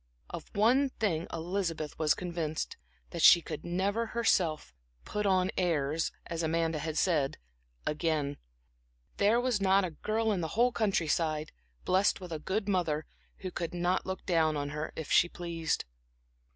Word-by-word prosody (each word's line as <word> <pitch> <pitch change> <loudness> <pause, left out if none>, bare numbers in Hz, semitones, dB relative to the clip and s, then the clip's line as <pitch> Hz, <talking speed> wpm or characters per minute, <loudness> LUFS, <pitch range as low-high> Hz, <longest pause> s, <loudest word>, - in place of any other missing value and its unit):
Of - - -7
one 250 +7 +4
thing 175 -10 -1
Elizabeth 165 -2 -3
was 155 -2 +3
convinced, 170 -3 -3 0.4
that - - -4
she 175 - +9
could 160 -2 -7
never 200 +6 0
herself 180 - +1 0.3
"put 210 -1 -1
on 185 -1 +2
airs" 160 -3 0
as 170 -1 -3
Amanda 165 -1 0
had 160 +1 -3
said, 150 -7 +1 0.5
again; 150 -2 -1 0.8
there 210 +4 +4
was 245 -4 0
not 195 0 +4
a 175 - -4
girl 220 +7 -1
in 190 -4 0
the 160 - -1
whole 245 +1 +5
countryside, 165 -8 0 0.3
blessed 190 +2 +3
with 180 -2 -9
a 160 - -3
good 200 +6 -2
mother, 165 -6 0 0.4
who 185 -1 -4
could 170 0 -4
not 175 +2 0
look 190 0 -4
down 160 -4 +2
on 145 0 -2
her, 150 +1 -4
if 160 - -6
she 175 - +5
pleased. 170 -2 -2
175 Hz, 155 wpm, -31 LUFS, 160-195 Hz, 0.8 s, she